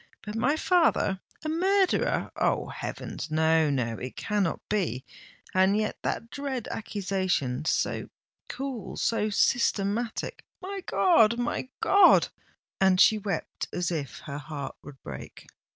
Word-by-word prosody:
But 210 - -5
my 245 +6 +2
father—a 315 - +1
murderer—Oh! 375 +4 +1
heavens—no—no—it 150 -7 -1
cannot 205 -5 -1
be! 180 -11 -1 0.5
And 190 +2 +4
yet 215 0 -2
that 230 - -3
dread 270 -4 -4
accusation—so 185 - -1 0.4
cool—so 230 -4 -2
systematic——my 235 - -1
God! 235 - +4
my 245 +1 -2
God!" 400 +1 +6 0.5
And 190 -1 +4
she 215 +2 +6
wept 195 -5 -4
as 180 -1 -1
if 145 -6 -4
her 140 0 -6
heart 150 -2 -6
would 140 -2 -12
break. - - -9
205 Hz, 100 wpm, -27 LUFS, 160-245 Hz, 0.5 s, God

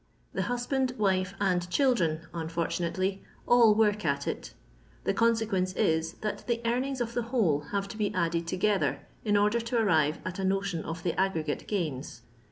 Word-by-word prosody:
The - - -1
husband, 250 +1 0
wife, 190 -2 +1
and 180 -3 +1
children 180 - +2
(unfortunately) 170 +3 -2 0.2
all 235 -3 +6
work 210 -1 +2
at 140 -2 0
it. - - -4 0.5
The - - +1
oonseqneoee 220 -5 +1
is, 160 0 +1
that 215 - -4
the 235 -1 +1
earnings 255 +3 0
of 235 -1 -2
the 240 - 0
whole 200 - +2
have 200 -1 -1
to 215 - -8
be 210 -2 0
added 170 -1 0
together 190 +3 +1 0.2
in 210 -2 +3
order 210 +3 +3
to 230 +1 -2
arrive 160 -9 +3
at 185 +1 -4
a - - -1
notion 195 -3 0
of 165 +1 -5
the 175 - 0
aggregate 165 -6 -1
gains. 155 -10 -3
195 Hz, 170 wpm, -29 LUFS, 170-225 Hz, 0.5 s, all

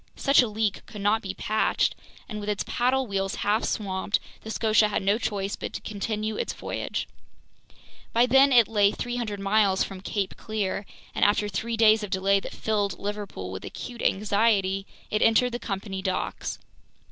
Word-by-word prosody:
Such 275 0 +5
a 245 - +1
leak 215 -1 -1
could 210 - -8
not 210 +2 +2
be 190 -1 -5
patched, 215 +1 +1 0.3
and 215 -3 -5
with 205 0 -4
its 205 - 0
paddle 260 +2 +1
wheels 195 -3 -2
half 210 +2 +2
swamped, 195 -1 -1 0.2
the 220 - -9
Scotia 220 -1 +3
had 205 - -1
no 200 +3 +2
choice 200 -3 -2
but - - -6
to - - -5
continue 215 +1 -3
its - - -2
voyage. - - -4 1.0
By 235 +1 +4
then 270 +2 +5
it 240 -4 +6
lay 205 -2 +3
300 240 -4 -3
miles 195 -1 +3
from 190 -1 -7
Cape 200 -1 -2
Clear, 205 -2 -3 0.3
and - - 0
after 205 0 +3
three 225 +4 -3
days 220 -1 +6
of 210 - -5
delay 195 +1 +2
that - - -8
filled 205 -2 -1
Liverpool 200 - -5
with 95 - -6
acute 245 -2 -7
anxiety, 200 -1 +2 0.2
it 210 - +1
entered 245 +2 +4
the 240 - -3
company 195 -2 -4
docks. 190 -1 -2
210 Hz, 175 wpm, -26 LUFS, 195-225 Hz, 1.0 s, it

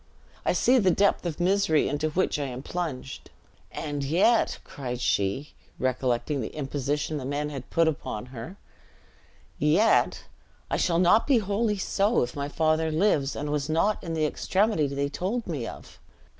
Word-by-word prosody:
I - - +2
see 255 +1 +4
the 190 -4 +3
depth 195 -1 +2
of 160 - -4
the 175 - -1
misery 190 -4 +3
into 150 +2 -1
which 165 -1 0
I 145 - -1
am 130 0 -6
plunged. 150 -8 -5 0.4
And 145 -2 -4
yet," 180 +11 +3
cried 125 -3 -6
she, 100 +5 0 0.2
recollecting 130 +2 0
the 110 - -6
imposition 145 +1 -2
the 140 - -5
men 145 +2 -2
had 135 -3 -7
put 165 -1 +3
upon 140 -8 -3
her: 125 +10 -7 1.0
"yet, 165 +10 +3 0.5
I - - +1
shall 170 -2 +1
not 180 +5 +4
be 275 -4 +5
wholly 210 +1 0
so, 200 - +1
if 120 - -5
my 140 0 -3
father 160 +1 +1
lives, 155 -4 +1
and 145 +1 -3
was 150 0 -1
not 165 +7 +1
in 165 -2 -3
the 155 -1 +1
extremity 190 0 +1
they 140 +1 -1
told 195 +11 -3
me 140 -9 -3
of!" - - -11
155 Hz, 170 wpm, -26 LUFS, 140-185 Hz, 1.0 s, be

